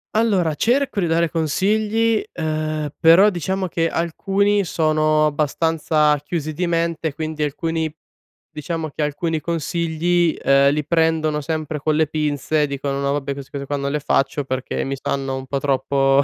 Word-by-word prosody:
Allora, 195 -8 +2
cerco 250 - +1
di - - +1
dare 165 0 +1
consigli, 215 +8 +1
uhm, 155 -2 -2
però 170 +5 +6
diciamo 190 +1 -2
che 165 -1 0
alcuni 195 +5 +1
sono 155 -2 +2
abbastanza 150 0 +1
chiusi 155 -1 -3
di 180 +4 -1
mente, 165 -2 -1
quindi 155 0 -3
alcuni 160 +1 -2 0.6
diciamo 160 +1 -4
che 150 - -3
alcuni 155 +2 -1
consigli, 170 +1 0
ehm, 140 0 +4
li 150 0 -1
prendono 160 -2 +1
sempre 155 0 -3
con 155 +2 0
le 155 0 +2
pinze. 150 0 0
Dicono: 140 0 -3
"No 140 0 0
vabbè, 140 -1 -2
queste 140 -1 -10
cose 140 -1 -5
qua 145 - -1
non 140 0 -2
le 150 - -1
faccio, 140 0 0
perché 130 -1 -3
mi 135 - -2
sanno 135 -1 -2
un 130 0 -6
po' 140 +1 -2
troppo 135 0 +2
155 Hz, 160 wpm, -21 LUFS, 145-170 Hz, 0.6 s, però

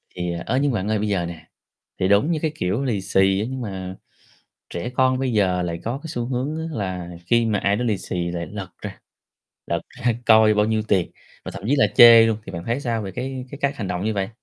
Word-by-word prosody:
Thì, 90 -1 -2
ơ, 130 - 0
nhưng 145 -1 +2
bạn 105 -3 -2
ơi 110 -1 0
bây 105 - -1
giờ 95 -4 0
nè, 80 -2 -9 0.5
thì 95 - +2
đúng 100 - +3
như 160 - 0
cái, 160 - 0
kiểu, 100 +1 -1
lì 115 -7 -1
xì 95 0 +2
á, 110 - -1
nhưng 130 -1 -5
mà, 95 -4 -5 0.8
trẻ 85 +7 -4
con 130 0 +2
bây 130 -1 -1
giờ 95 -4 +2
lại 85 -1 -4
có 120 +4 -2
cái 160 - -7
xu 120 -6 -3
hướng 130 +5 -2
á 160 - -4
là 90 -3 -4 0.2
khi 120 -1 +3
mà 105 -2 +1
ai 100 +1 +1
đó 125 - -2
lì 105 -5 0
xì 85 -1 -3
lại 85 -1 -4
lật 100 -3 -6
ra, - - -7 0.7
lật 85 0 -1
ra 125 -3 -1
coi 110 -1 +6
bao 105 0 +2
nhiêu 110 0 0
tiền, 95 -4 +1 0.3
và - - -5
thậm - - -9
chí 140 - +4
là - - +5
chê 115 -1 +9
luôn, 110 -2 0
thì - - -7
bạn 85 -1 -6
thấy 120 +4 -1
sao 115 -5 -2
về 100 - -5
cái 130 0 -5
cái 140 - -8
cách 140 -1 0
hành 100 -5 -4
động 90 +2 -3
như 110 - 0
vậy? 95 -1 -1
105 Hz, 260 wpm, -22 LUFS, 95-125 Hz, 0.8 s, chê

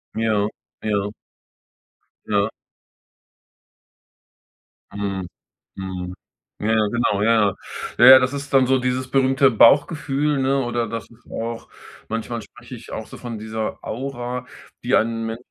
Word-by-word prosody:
Ja, 110 -2 +1 0.4
ja. 105 -1 -1 1.1
Ja. 105 0 +1 2.4
Mhm, 100 -2 -3 0.5
mhm, 90 -1 -5 0.5
ja, - - -2
ja, 110 -1 +3
genau, 105 -3 0
ja, 115 +2 +4 0.2
ja. - - -9 0.4
Ja, - - +6
ja, 130 - +11
das 125 +1 0
ist 140 0 -6
dann 135 -1 +5
so 130 +1 +3
dieses 125 0 -2
berühmte 135 0 +4
Bauchgefühl, 145 +4 +3
ne, 135 +1 +1
oder 120 -1 -1
das 115 0 -6
ist 120 +1 -21
auch 115 0 -5 0.4
manchmal 115 +1 -3
spreche 120 +4 -12
ich 120 - -12
auch 110 - -5
so - - -11
von 120 -3 -6
dieser 110 0 -4
Aura, 125 0 -4 0.4
die - - 0
ein 115 0 +1
115 Hz, 130 wpm, -22 LUFS, 110-130 Hz, 2.4 s, ja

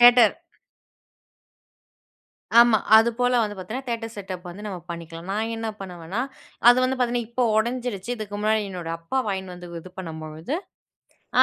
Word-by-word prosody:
Theatre. 240 -2 +8 2.3
ஆமா. 235 -2 +7 0.2
அது 225 +1 +5
போல 245 0 +3
வந்து 205 -1 -3
பாத்தீங்கன்னா, 220 +9 -5
தியேட்டர் 230 -1 -3
செட்டப் 185 -3 -6
வந்து 195 +4 -9
நம்ம 190 - -4
பண்ணிக்கலாம். 170 0 -7
நான் 220 +2 -1
என்ன 225 0 -3
பண்ணுவேன்னா, 180 +2 -4 0.5
அது 245 - +10
வந்து 260 +1 +1
பாத்தீங்கன்னா 240 -2 +1
இப்போ 245 +1 0
உடஞ்சிடுச்சு. 235 -2 -1
இதுக்கு 210 -3 -6
முன்னாடி 215 +1 +3
என்னோட 175 -3 -5
அப்பா 165 +11 -3
வாங்கின்னு 190 -2 -3
வந்து 175 0 -10
இது 185 - -11
பண்ணும்பொழுது, 160 - -5 0.9
அ - - +11
210 Hz, 145 wpm, -25 LUFS, 180-235 Hz, 2.3 s, அ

